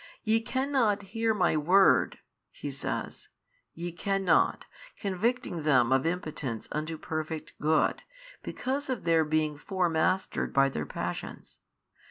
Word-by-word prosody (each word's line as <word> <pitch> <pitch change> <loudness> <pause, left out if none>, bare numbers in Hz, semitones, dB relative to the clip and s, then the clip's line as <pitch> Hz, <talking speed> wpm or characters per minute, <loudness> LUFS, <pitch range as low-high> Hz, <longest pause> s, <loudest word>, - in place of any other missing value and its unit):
Ye 225 0 +2
cannot 260 -5 +1
hear 225 +3 0
My 210 -6 +2
Word. 180 +6 +4 0.3
He - - -6
says, - - -5 0.5
ye 175 +1 -4
cannot, 195 +2 +1 0.3
convicting 205 -1 -1
them 130 -5 +3
of 135 +3 +3
impotence 155 -9 -3
unto 155 +2 -3
perfect 155 0 -5
good, 155 +1 +2 0.4
because 270 +2 -3
of 250 -6 -2
their 165 -1 +4
being 155 -1 0
fore 185 0 0
mastered 185 +4 0
by 135 0 +5
their 75 - -4
passions. - - -6
175 Hz, 125 wpm, -29 LUFS, 155-210 Hz, 0.5 s, by